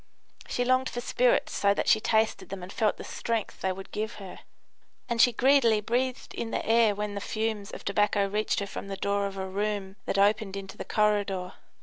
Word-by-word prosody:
She 245 Hz, -, -1 dB
longed 255 Hz, +1 st, +2 dB
for 240 Hz, -, -4 dB
spirits -, -, +2 dB
so 200 Hz, 0 st, +2 dB
that -, -, -1 dB
she 220 Hz, -, +5 dB
tasted 220 Hz, 0 st, +1 dB
them 190 Hz, -1 st, -6 dB
and 185 Hz, -, -8 dB
felt 215 Hz, -2 st, +1 dB
the -, -, -8 dB
strength 230 Hz, -2 st, -3 dB
they 190 Hz, -, +1 dB
would 190 Hz, +1 st, -8 dB
give 215 Hz, +2 st, -3 dB
her; 195 Hz, -3 st, -9 dB, 0.7 s
and 235 Hz, -1 st, +2 dB
she 245 Hz, -, +6 dB
greedily 240 Hz, -2 st, +4 dB
breathed 250 Hz, +4 st, -2 dB
in 230 Hz, -, -4 dB
the -, -, -2 dB
air 225 Hz, -2 st, +4 dB
when 210 Hz, 0 st, -3 dB
the 200 Hz, -, -4 dB
fumes 215 Hz, -1 st, -2 dB
of -, -, -9 dB
tobacco 205 Hz, 0 st, +2 dB
reached 210 Hz, +2 st, 0 dB
her -, -, -1 dB
from 200 Hz, -, -7 dB
the 195 Hz, -1 st, -5 dB
door 200 Hz, 0 st, 0 dB
of 195 Hz, 0 st, -8 dB
a 190 Hz, -, -3 dB
room 200 Hz, 0 st, -3 dB
that -, -, 0 dB
opened 200 Hz, 0 st, +2 dB
into 195 Hz, -1 st, -7 dB
the -, -, -7 dB
corridor. 205 Hz, -3 st, 0 dB
210 Hz, 215 wpm, -28 LUFS, 200-225 Hz, 0.7 s, she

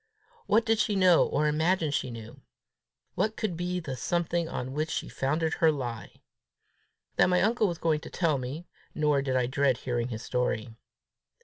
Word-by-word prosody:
What 225 Hz, +2 st, +3 dB
did 225 Hz, -2 st, +2 dB
she 215 Hz, -1 st, +1 dB
know, 185 Hz, -3 st, +5 dB
or 150 Hz, +2 st, +1 dB
imagine 160 Hz, +1 st, +1 dB
she 135 Hz, -, -1 dB
knew? 115 Hz, -1 st, -10 dB, 0.7 s
What 215 Hz, +1 st, 0 dB
could 210 Hz, -6 st, -2 dB
be 180 Hz, +1 st, -2 dB
the 145 Hz, -6 st, -5 dB
something 170 Hz, +3 st, -1 dB
on 130 Hz, +1 st, -4 dB
which 155 Hz, +2 st, -1 dB
she -, -, -3 dB
founded 155 Hz, +4 st, -1 dB
her 160 Hz, -1 st, +4 dB
lie? 120 Hz, -6 st, -6 dB, 0.9 s
That -, -, +5 dB
my 180 Hz, 0 st, +3 dB
uncle 220 Hz, 0 st, +2 dB
was 170 Hz, -2 st, -3 dB
going 160 Hz, -2 st, +1 dB
to -, -, -10 dB
tell 160 Hz, -6 st, +1 dB
me, 135 Hz, +7 st, -6 dB, 0.3 s
nor 150 Hz, -2 st, +2 dB
did 130 Hz, -1 st, -1 dB
I 125 Hz, -1 st, +2 dB
dread 135 Hz, -1 st, +1 dB
hearing 120 Hz, -2 st, -2 dB
his 115 Hz, -1 st, -6 dB
story. 120 Hz, -2 st, -2 dB
155 Hz, 180 wpm, -28 LUFS, 130-175 Hz, 0.9 s, know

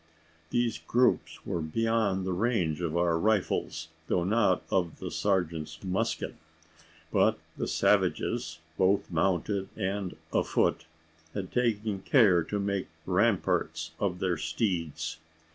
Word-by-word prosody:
These 120 Hz, -2 st, 0 dB
groups 125 Hz, +1 st, +1 dB
were 85 Hz, -, -2 dB
beyond 100 Hz, +2 st, +1 dB
the 95 Hz, -, -1 dB
range 90 Hz, -6 st, 0 dB
of 85 Hz, -1 st, -1 dB
our 85 Hz, -1 st, +2 dB
rifles, 95 Hz, -5 st, 0 dB, 0.2 s
though 90 Hz, -, +1 dB
not 100 Hz, -1 st, +2 dB
of 90 Hz, -4 st, 0 dB
the -, -, -6 dB
sergeant's 85 Hz, -6 st, -1 dB
musket. 95 Hz, 0 st, -1 dB, 0.8 s
But -, -, +3 dB, 0.2 s
the -, -, -2 dB
savages -, -, +1 dB, 0.2 s
both 95 Hz, +1 st, +2 dB
mounted 95 Hz, +3 st, 0 dB
and 95 Hz, -2 st, -2 dB, 0.2 s
afoot -, -, +1 dB, 0.5 s
had 95 Hz, -3 st, -4 dB
taken 110 Hz, -4 st, 0 dB
care 95 Hz, -5 st, +5 dB
to 105 Hz, -, -2 dB
make 100 Hz, -1 st, -1 dB, 0.2 s
ramparts 80 Hz, 0 st, +1 dB
of 95 Hz, -3 st, 0 dB
their 90 Hz, -2 st, 0 dB
steeds. 80 Hz, -2 st, -2 dB
95 Hz, 120 wpm, -29 LUFS, 85-105 Hz, 0.8 s, care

